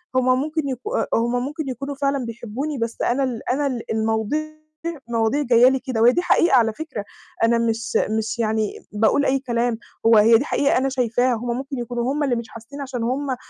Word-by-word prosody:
هم 255 0 +3
ممكن 305 -1 -2
يك 255 -2 -3 0.3
أ - - +4
هم 245 +2 0
ممكن 295 +1 -5
يكونوا 275 +3 -5
فعلًا 275 -2 -1
بيحبوني، 235 +6 -5
بس 230 -1 -3
أنا 260 +3 +1
ال 245 -4 -2
أنا 280 +3 +1
ال 245 -4 -4
المواضيع 220 +5 0 0.7
المواضيع 230 +4 +1
جاية 245 -2 +5
لي 265 0 0
كده، 250 -3 -3
وهي 240 +2 +7
دي 350 - 0
حقيقة 340 -4 +3
على 225 -2 +3
فكرة، 270 -8 -6 0.4
أنا 230 +1 +4
مش 230 -1 0 0.2
مش 220 +2 -3
يعني 220 -2 -1
باقول 220 +7 +2
أي 270 +1 +2
كلام، 240 -2 -1 0.3
هو 225 -1 +7
هي 225 +2 +7
دي 265 - -2
حقيقة 285 -2 +2
أنا 265 +1 +1
شايفاها، 250 -1 +1
هم 240 +1 -2
ممكن 275 +1 -5
يكونوا 240 +2 -2
هم 295 +1 -1
اللي 260 -4 +1
مش 235 -1 -5
حاسين 230 +6 -10
عشان 255 -4 -4
هم 260 +2 -1
245 Hz, 205 wpm, -22 LUFS, 230-275 Hz, 0.7 s, وهي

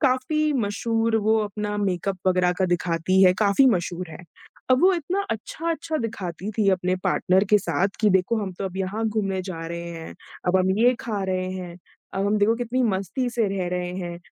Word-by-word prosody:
काफ़ी 295 +3 +1
मशहूर 225 +2 0
वो 220 0 +4
अपना 210 0 -4
मेकअप 195 -1 -1
वगैरह 180 -1 +3
का 190 - +3
दिखाती 175 +1 +1
है, 180 -1 +7
काफ़ी 210 +6 +4
मशहूर 180 -2 -2
है। - - -9 0.5
अब 255 - +5
वो 380 - +6
इतना 355 +4 -1
अच्छा-अच्छा 320 +8 -3
दिखाती 195 -3 -4
थी 210 -2 +1
अपने 185 0 +1
पार्टनर 190 +2 +2
के 210 - +7
साथ 195 0 0
कि 215 - +4
देखो, 190 +5 +2
हम 190 -2 -4
तो 185 - -6
अब 190 -1 -5
यहाँ 195 +4 -2
घूमने 195 -3 -1
जा 170 -3 -6
रहे 170 +1 -5
हैं, 165 -1 -8 0.3
अब 180 +1 +3
हम 185 0 +2
ये 245 +3 +5
खा 210 -4 -3
रहे 185 -1 -1
हैं, 180 -2 -7 0.4
अब 195 +1 0
हम 210 +1 +2
देखो 210 +2 +3
कितनी 245 +1 -1
मस्ती 200 +3 -1
से 230 -3 +1
रह 195 -2 -2
रहे 180 0 -3
हैं। 175 -1 -5
195 Hz, 195 wpm, -24 LUFS, 185-225 Hz, 0.5 s, है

